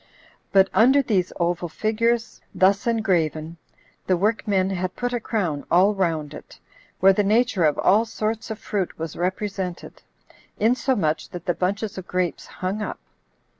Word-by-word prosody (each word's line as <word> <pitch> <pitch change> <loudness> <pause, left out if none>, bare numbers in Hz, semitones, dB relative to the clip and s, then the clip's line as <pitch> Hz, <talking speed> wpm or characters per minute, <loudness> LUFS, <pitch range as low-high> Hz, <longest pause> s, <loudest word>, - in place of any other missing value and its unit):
But 195 -1 +5
under 265 +5 +5
these 190 -7 0
oval 175 0 -1
figures, 230 +4 -1
thus 195 +5 +3
engraven, 170 -8 0 0.5
the 185 - +3
workmen 200 -1 +1
had 185 -1 -3
put 245 0 -2
a 245 - 0
crown 175 -11 -2
all 190 +4 +4
round 160 -6 -1
it, - - -12 0.4
where 195 +1 +7
the 205 - +2
nature 215 -3 +2
of 150 - +2
all 210 +5 +4
sorts 220 0 -3
of 220 - -4
fruit 200 -4 -3
was 160 -1 -5
represented, 185 0 -4 0.6
insomuch 215 - +1
that 175 -1 -8
the 175 - +1
bunches 200 +4 -2
of 185 - -10
grapes 180 -2 -2
hung 190 +3 -4
up. 210 - -4
195 Hz, 150 wpm, -23 LUFS, 175-220 Hz, 0.6 s, where